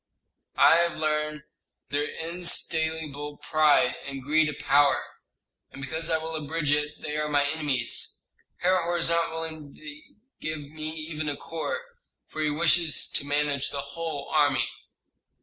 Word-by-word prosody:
"I 165 - +7
have 170 0 +2
learned 150 -1 -1 0.5
their 145 0 0
insatiable 160 -3 -1
pride, 150 -5 +3
and 135 -1 -6
greed 155 +2 +3
of 150 - -6
power. 145 0 +4 0.7
And - - -12
because 160 +4 -2
I 160 - +3
will 160 0 -5
abridge 155 0 -1
it 150 0 0
they 150 -1 -3
are 150 0 -1
my 145 -1 +3
enemies. 145 -6 -1 0.4
Herhor 175 -1 +2
is 165 0 +1
not 170 0 +2
willing 160 -3 -6
to 150 -1 -9 0.4
give 150 -2 -5
me 155 0 -5
even 155 -1 -4
a 145 - -3
corps, 320 - -4 0.4
for 155 - -6
he 155 - +2
wishes 160 +1 +2
to - - +1
manage 145 -1 +1
the 140 - -3
whole 160 -4 -4
army." 140 -6 +3
155 Hz, 150 wpm, -27 LUFS, 145-160 Hz, 0.7 s, I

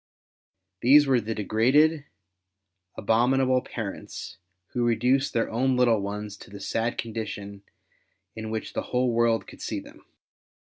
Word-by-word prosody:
These 145 +4 +7
were 130 -3 +3
the 110 +1 -4
degraded, 135 +9 +3 0.9
abominable 130 +4 +2
parents 105 -4 -7 0.3
Avho 120 - 0
reduced 125 +4 +2
their 115 - +1
own 130 +3 +1
little 120 -3 +4
ones 105 +1 -5
to - - -13
the 100 0 -10
sad 115 +4 -2
condition 105 -3 -5 0.7
in 110 0 -6
which 110 0 -4
the - - -1
Avhole 125 0 0
world 115 -1 +2
could - - -13
see - - -3
them. - - -15
115 Hz, 135 wpm, -26 LUFS, 110-130 Hz, 0.9 s, These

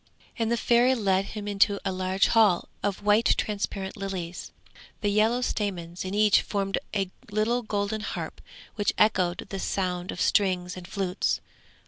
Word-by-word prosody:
And 225 0 0
the 235 - +2
Fairy 240 +3 +4
led 195 -4 +1
him 210 0 -6
into 200 0 +2
a 195 - +1
large 185 +1 +1
hall 215 -6 +4
of 205 0 -2
white 210 +2 +4
transparent 200 -2 -3
lilies, 185 -3 -5 0.5
the 205 - +1
yellow 220 +4 +3
stamens 180 -7 -3
in 190 +1 -4
each 210 -1 +5
formed 195 -1 -1 0.2
a 195 -2 0 0.2
little 215 +4 +1
golden 210 -1 -2
harp - - -5 0.3
which 205 -2 0
echoed 185 -4 +2
the 195 - -4
sound 180 -2 -2
of - - -7
strings 180 -3 +1
and 180 -1 -9
flutes. 195 -1 -1
200 Hz, 155 wpm, -27 LUFS, 185-215 Hz, 0.5 s, each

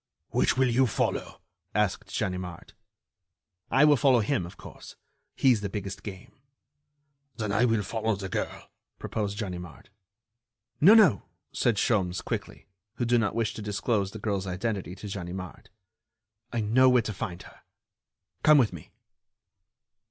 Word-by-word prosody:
"Which 110 - +2
will 130 0 +4
you 125 +2 +3
follow?" - - -2 0.3
asked 105 -3 0
Ganimard. 90 -2 -4 1.0
"I 135 +4 +5
will 150 -1 +6
follow 130 -3 +4
him, 105 -5 -1
of - - -13
course. - - -12 0.4
He's 125 -6 +3
the 100 - -3
biggest 100 0 -5
game." 95 -2 -9 1.1
"Then 110 -2 -2
I 110 +5 +3
will 115 -3 +1
follow 110 0 -1
the 100 0 -6
girl," - - -4 0.3
proposed 105 -2 -3
Ganimard. 90 -5 -7 0.9
"No, 195 +9 +8
no," 180 - +5 0.3
said 120 - +1
Sholmes, 95 -5 0
quickly, - - -5 0.3
who 120 - -1
did 120 0 +3
not 105 - -1
wish 115 -2 0
to - - -7
disclose 105 0 -1
the 110 - -9
girl's 100 -2 -2
identity 95 -1 -3
to 105 - -9
Ganimard, 95 -1 -7 0.8
"I 120 - -1
know 125 +5 +4
where 125 -2 +4
to 110 - -4
find 90 -2 -5
her. - - -16 0.8
Come 150 0 +6
with 120 -8 +3
me." 85 - -10
105 Hz, 145 wpm, -27 LUFS, 95-120 Hz, 1.1 s, No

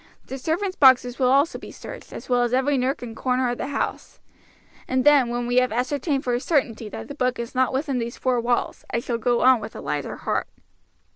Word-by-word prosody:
The 270 - -7
servants' 370 +7 -1
boxes 260 -2 +5
will 255 -1 +3
also 280 +5 +3
be - - -10
searched, - - -10
as - - -9
well 245 -1 +2
as 240 +1 +1
every 275 +2 +2
nook 260 0 -1
and 230 -2 -7
corner 255 0 0
of 245 - -5
the - - -3
house; 280 0 -4 0.7
and 255 0 +1
then, 285 -4 +5
when 240 0 -2
we 245 +1 0
have 255 -2 +3
ascertained 270 +4 -1
for 245 - -1
a 240 - +1
certainty 245 -7 -1
that - - -7
the 285 - -7
book 255 -3 -1
is 235 -1 -5
not 255 0 +2
within 270 -1 -1
these 235 0 -4
four 255 -2 +1
walls, 240 +1 -1
I - - -1
shall 235 0 -3
go 240 +1 +1
on 255 -1 +6
with 215 - -8
a - - -6
lighter - - -3
heart." - - -2
255 Hz, 230 wpm, -23 LUFS, 240-270 Hz, 0.7 s, on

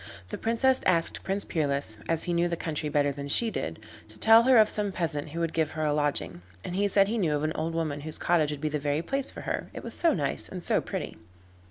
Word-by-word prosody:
The - - -4
Princess 245 +3 +2
asked 170 -2 +2
Prince 195 +1 -1
Peerless, 140 -8 -1
as 165 -1 +2
he 175 - -1
knew 170 +1 +2
the 170 -1 -2
country 155 -2 -3
better 145 -1 +2
than 140 0 -6
she 225 +10 +2
did, - - -4 0.3
to - - -14
tell 225 +1 +7
her 260 -1 +6
of 215 -1 +7
some 205 -2 -2
peasant 160 -5 -3
who 165 +3 -5
would 165 -1 -1
give 160 -2 0
her 155 - 0
a 150 - +1
lodging, 145 -11 -1 0.2
and 180 - -5
he 205 +1 +2
said 195 0 +4
he 225 +2 -1
knew 160 -6 +1
of 145 - -2
an 155 0 0
old 165 +1 -3
woman 155 -3 -2
whose 155 +1 -2
cottage 165 -4 +2
would 150 -1 -5
be 155 - 0
the 150 0 -2
very 145 +2 -1
place 275 +8 -2
for - - -8
her, - - -3
it - - -7
was - - -5
so 335 - +2
nice 145 -5 -2
and 180 -2 -7
so - - +2
pretty. - - -5
165 Hz, 260 wpm, -28 LUFS, 150-195 Hz, 0.3 s, tell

